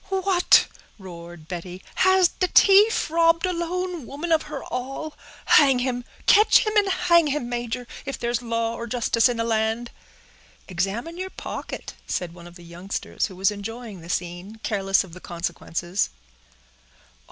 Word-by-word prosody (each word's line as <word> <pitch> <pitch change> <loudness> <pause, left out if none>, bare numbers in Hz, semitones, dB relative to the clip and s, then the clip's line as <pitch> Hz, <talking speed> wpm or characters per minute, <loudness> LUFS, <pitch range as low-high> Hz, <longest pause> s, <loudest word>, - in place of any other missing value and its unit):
_" 380 -1 -1
"What!" 365 -3 +5 0.3
roared 170 -4 -11
Betty, 180 +2 -7
"has 375 -1 +5
the 370 - +2
t'ief 400 -1 +5
robbed 330 +1 +3
a 365 - -1
lone 345 -3 -3
woman 300 +5 -5
of 320 -1 +4
her 295 -2 -6
all! 270 +5 -5 0.3
Hang 275 -3 +6
him—catch 250 - +3
him 430 0 -2
and 410 -2 +4
hang 355 -3 +3
him, 285 -4 -2
major; 240 0 -4 0.2
if 275 - -5
there's 240 0 -2
law 230 -1 -1
or 235 0 -6
justice 235 0 +2
in 240 - -2
the 230 - 0
land." 225 +1 -1 0.8
"Examine 205 - -3
your 375 0 -4
pocket," - - -7
said 175 -2 -3
one 175 0 -12
of 175 - -14
the 175 - -13
youngsters, 175 +3 -4
who 190 - -12
was 190 +2 +2
enjoying 210 -1 -7
the 165 - -12
scene, 175 +4 -4
careless 195 -2 +1
of 180 -4 -14
the 180 - -11
consequences. 175 +1 -3
240 Hz, 160 wpm, -24 LUFS, -, 0.8 s, Hang